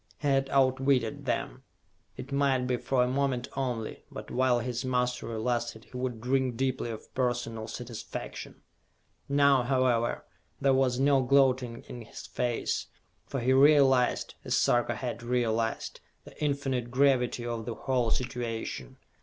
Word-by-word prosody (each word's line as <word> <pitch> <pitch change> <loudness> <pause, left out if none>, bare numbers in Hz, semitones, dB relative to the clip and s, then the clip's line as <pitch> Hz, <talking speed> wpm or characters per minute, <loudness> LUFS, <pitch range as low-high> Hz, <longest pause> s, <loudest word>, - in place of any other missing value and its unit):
He 145 - -3
had 135 -1 +2
outwitted 130 -3 +2
them. - - -2 0.6
It 130 - -8
might 140 -2 +2
be 125 -1 0
for 125 0 +1
a - - +1
moment 130 -1 0
only, 125 -5 -3
but - - -9
while 130 -1 +3
his 120 +1 -3
mastery 125 -2 -1
lasted 120 -1 -2
he - - -16
would 125 -2 -3
drink 130 0 0
deeply 130 -2 -1
of 110 -2 -8
personal 120 -3 -1
satisfaction. 120 -1 -7 0.7
Now, 140 -1 +5
however, 125 -2 +1 0.3
there 135 -1 +3
was 130 -1 +2
no 135 0 +4
gloating 130 -2 +2
in 120 - -8
his 115 - -10
face, 120 -1 -2 0.4
for 135 - -3
he 130 +2 +3
realized, 135 -2 +4
as - - 0
Sarka 120 -1 +2
had 120 0 -4
realized, 115 -2 -1 0.2
the - - -14
infinite 135 -4 -1
gravity 125 -2 +2
of 115 -2 -3
the 115 - -3
whole 125 -4 0
situation. 115 - -3
125 Hz, 145 wpm, -29 LUFS, 120-135 Hz, 0.7 s, Now